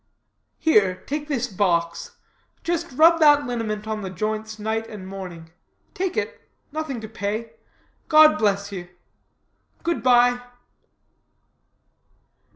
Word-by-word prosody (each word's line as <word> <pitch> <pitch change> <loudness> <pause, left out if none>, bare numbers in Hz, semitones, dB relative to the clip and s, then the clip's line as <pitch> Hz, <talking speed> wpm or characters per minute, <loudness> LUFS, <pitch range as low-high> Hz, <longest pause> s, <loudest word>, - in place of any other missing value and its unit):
Here, 205 - +3
take 295 +1 -4
this 270 -5 -1
box; 175 -6 -1 0.5
just 340 -1 -2
rub 330 +5 +6
that 290 -2 +6
liniment 220 -3 -3
on 215 -1 -3
the 190 - -5
joints 215 +3 -3
night 220 +1 -2
and 200 -4 -9
morning. 180 -4 -8 0.4
Take 375 0 -2
it. - - -3 0.3
Nothing 305 -5 -4
to 220 - -7
pay. 220 +1 -4 0.6
God 310 -3 +7
bless 200 -1 +1
you. 180 -3 -6 1.0
Good 340 0 -1
bye." 245 -1 +4
220 Hz, 115 wpm, -23 LUFS, 200-290 Hz, 1.0 s, God